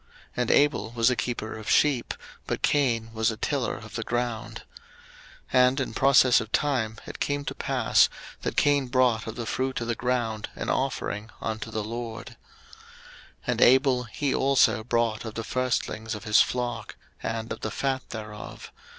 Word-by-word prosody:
And 125 -1 0
Abel 130 -6 +3
was 115 +1 +4
a - - +1
keeper 115 -2 -3
of 110 -1 -7
sheep, 140 -5 +3 0.3
but - - -3
Cain 115 -6 +1
was 110 +1 +1
a 110 - -4
tiller 135 -1 -1
of 110 -2 -11
the 115 - -3
ground. 120 -1 -3 0.9
01:004:003 125 -1 +7
And 130 +2 0
in 130 - -2
process 130 -2 +5
of 110 -1 -8
time 120 -7 0
it - - -8
came 145 0 -1
to - - -3
pass, - - +3 0.3
that - - -3
Cain 145 -2 +3
brought 125 -3 +2
of 110 - -5
the 120 - -4
fruit 130 +3 -1
of 120 - -3
the 120 - +1
ground 115 -3 -1
an - - -4
offering 110 -5 -2
unto 110 0 -4
the 110 -1 -3
LORD. 115 +1 -6
01:004:004 - - -16 1.1
And - - -1
Abel, 130 0 +5
he 135 +5 -2
also 135 -4 +3
brought 115 -2 0
of 110 -2 -7
the 115 - -3
firstlings 115 -2 -2
of 105 - -8
his 105 -1 +5
flock 125 -1 -2 0.3
and 110 0 -3
of - - -9
the 110 - -2
fat 130 +4 -2
thereof. 105 -1 -8
120 Hz, 175 wpm, -26 LUFS, 110-130 Hz, 1.1 s, 01:004:003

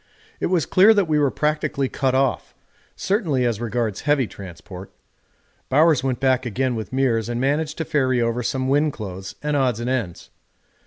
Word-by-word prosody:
It - - 0
was 175 -6 +1
clear 205 - +5
that 200 -4 +2
we 155 -1 +2
were 145 -2 +3
practically 150 -1 -1
cut 130 -1 -1
off, 135 -2 0 0.4
certainly 165 - 0
as 115 -2 -1
regards 115 -3 -2
heavy 145 -3 +2
transport. 95 -1 -10 0.8
Bowers 150 0 +4
went 130 -3 -1
back 130 -1 +2
again 130 +2 -1
with 110 -2 -5
Meares 120 -4 0
and 120 0 -2
managed 150 +4 -1
to 160 - -3
ferry 130 -4 +1
over 115 +1 0
some 130 +2 -2
wind 145 +2 +2
clothes 95 -3 -7
and 150 0 -1
odds 130 -5 +1
and 120 +2 -2
ends. 110 -10 -4
130 Hz, 175 wpm, -22 LUFS, 115-150 Hz, 0.8 s, clear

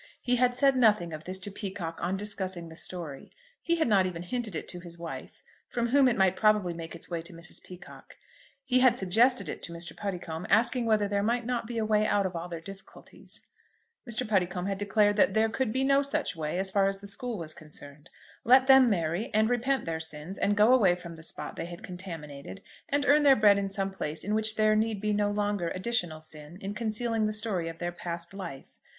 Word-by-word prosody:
He 250 0 +1
had 245 0 +3
said 275 +1 +4
nothing 210 -9 +3
of 155 0 -7
this 185 +1 -2
to 205 - -4
Peacocke 190 -5 -6
on 180 +3 -1
discussing 190 -4 -4
the 160 - -11
story. 160 -4 -4 0.3
He 335 - +1
had 325 -4 +1
not 195 -4 +4
even 175 -1 -5
hinted 220 0 -3
it - - -4
to 180 - -5
his 170 -1 -12
wife, 170 -1 -8 0.3
from 235 -1 -1
whom 275 +1 +5
it 240 -2 +1
might 190 -1 +3
probably 210 -3 +3
make 165 0 -7
its 165 - -8
way 170 -2 -3
to 170 +3 -9
Mrs. 170 +1 -7
Peacocke. 180 0 -13 0.5
He 255 -2 +3
had 255 -1 +5
suggested 230 +7 +3
it - - -5
to - - -7
Mr. 170 0 -6
Puddicombe, 180 -4 -5
asking 235 +3 +3
whether 215 -2 +3
there 200 0 0
might 235 +3 0
not 240 -2 -2
be 235 0 -5
a 220 - 0
way 215 0 +2
out 200 -1 +2
of 185 -1 -3
all 170 +1 -5
their 170 -1 -5
difficulties. 195 +3 -11 0.7
Mr. 220 -2 -2
Puddicombe 180 -3 0
had 195 -1 -2
declared 205 +1 +2
that 210 - +3
there 220 0 +3
could 245 0 -1
be 260 +3 0
no 275 +1 +4
such 285 -4 -2
way 155 +1 -3
as 190 0 0
far 195 -1 +3
as 195 0 -1
the 200 - -10
school 240 +2 -4
was 160 -3 -5
concerned. 150 0 -11 0.3
Let 260 +3 +6
them 265 -2 +7
marry, 175 - -1
and 220 +2 +3
repent 260 +3 0
their 165 -1 -2
sins, 160 +3 -6
and 205 0 +1
go 215 +4 +6
away 195 -9 +5
from 170 -1 -9
the 160 - -12
spot 160 - -6
they - - -3
had 175 0 -9
contaminated, 170 -2 -8 0.3
and 285 0 +1
earn 295 +2 +5
their 280 -2 +7
bread 205 -3 +5
in 195 -1 -2
some 195 0 -1
place 155 -4 -4
in 205 - -2
which 220 0 +1
there 215 0 +3
need 215 -1 0
be 210 +1 0
no 205 0 +1
longer 205 -4 -1
additional 185 -6 -2
sin 155 +1 -10
in 195 +1 -5
concealing 225 0 -1
the - - -1
story 210 -6 -1
of 165 - -8
their 175 +1 -3
past 170 0 -5
life. 170 -9 -9
200 Hz, 230 wpm, -29 LUFS, 175-225 Hz, 0.7 s, them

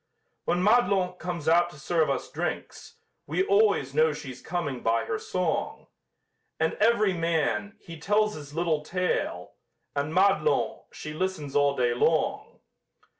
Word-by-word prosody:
When 175 +1 +1
Madelon 200 -5 +3
comes 175 -4 -5
out 175 +2 +4
to 150 - -14
serve 160 +1 +1
us 135 -2 -2
drinks, - - -5 0.3
We 175 +6 0
always 200 -10 +3
know 155 +1 +3
she's 135 -4 -8
coming 155 -8 -3
by 115 0 +1
her 110 - -2
song! 180 -4 -2 0.7
And 160 0 +1
every 215 -3 +3
man, 155 - -1
he 165 -2 -11
tells 210 +5 +2
his 145 -1 -10
little 165 -3 0
tale, 180 +3 -2 0.4
And 145 +2 -1
Madelon, 195 - +2
she 150 - -7
listens 155 -4 -3
all 145 -1 +3
day 120 -2 +1
long. 155 +6 0
165 Hz, 140 wpm, -27 LUFS, 145-185 Hz, 0.7 s, out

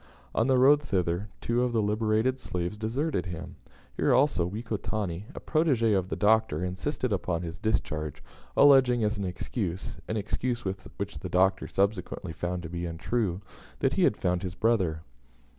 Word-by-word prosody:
On 115 - +2
the 130 -1 +4
road 140 +3 +6
thither, 95 -5 -1
two 120 +1 +1
of 125 -1 0
the 115 - +2
liberated 110 +4 +1
slaves 90 -1 -3
deserted 110 - -1
him. 85 -2 -7 0.4
Here - - +3
also, 130 - +3
Wekotani, 105 -3 -3
a - - -5
protege 135 -9 +2
of 95 -2 0
the - - -2
Doctor, 105 -6 +2
insisted 105 +6 -2
upon 90 -2 -1
his 85 -1 -6
discharge, 75 -8 -2 0.3
alleging 130 -4 +6
as 105 0 0
an 100 - -2
excuse 90 -1 -4
an 110 - -2
excuse 120 +3 -2
which 95 +1 -5
the 90 - -6
Doctor 95 +2 +2
subsequently 95 -3 -1
found 90 +1 -3
to - - -5
be 85 0 -3
untrue 90 +3 -1 0.4
that - - +1
he - - +1
had - - +3
found 90 0 0
his 90 -1 -5
brother. 95 -7 +1
100 Hz, 165 wpm, -28 LUFS, 90-115 Hz, 0.4 s, road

